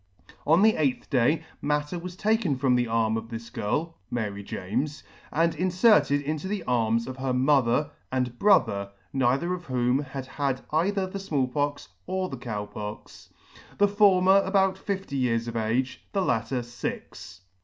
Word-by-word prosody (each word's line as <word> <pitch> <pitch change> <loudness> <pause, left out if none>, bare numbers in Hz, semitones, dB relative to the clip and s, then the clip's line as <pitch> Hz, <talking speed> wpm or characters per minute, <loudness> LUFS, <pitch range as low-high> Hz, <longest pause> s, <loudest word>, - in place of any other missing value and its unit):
On 165 +6 +5
the 220 0 +5
eighth 140 -2 -1
day 145 +5 +2 0.2
matter 150 +3 -1
was 180 +1 -7
taken 210 -6 +1
from 130 -1 +2
the 125 -1 +2
arm 115 -1 +1
of 115 0 -6
this 115 0 -7
girl, 155 +13 -2
(Mary 105 -4 -3
James,) 120 +10 -3 0.3
and 165 +1 +2
inferted 180 -3 +3
into 155 +4 -3
the 200 -2 -3
arms 115 -1 +1
of 130 0 -7
her 130 -1 -1
mother 135 +1 +2 0.2
and 125 -2 -2
brother, 100 - +3 0.2
(neither 135 +6 +1
of 175 -1 -6
whom 125 0 +1
had 135 -2 -6
had 135 -1 -2
either 190 +5 +1
the 185 +1 -6
Small 150 -9 0
Pox 145 +2 -2 0.2
or 185 0 -1
the 135 - -6
Cow 110 -4 -4
Pox,) 105 0 -9 0.5
the 205 - +5
former 195 -1 +5
about 190 -1 +2
fifty 190 -6 -4
years 115 -2 0
of 115 - -5
age, 115 +4 -1
the 195 - +1
latter 120 -2 0
fix. 120 -5 -7
140 Hz, 165 wpm, -26 LUFS, 120-180 Hz, 0.5 s, On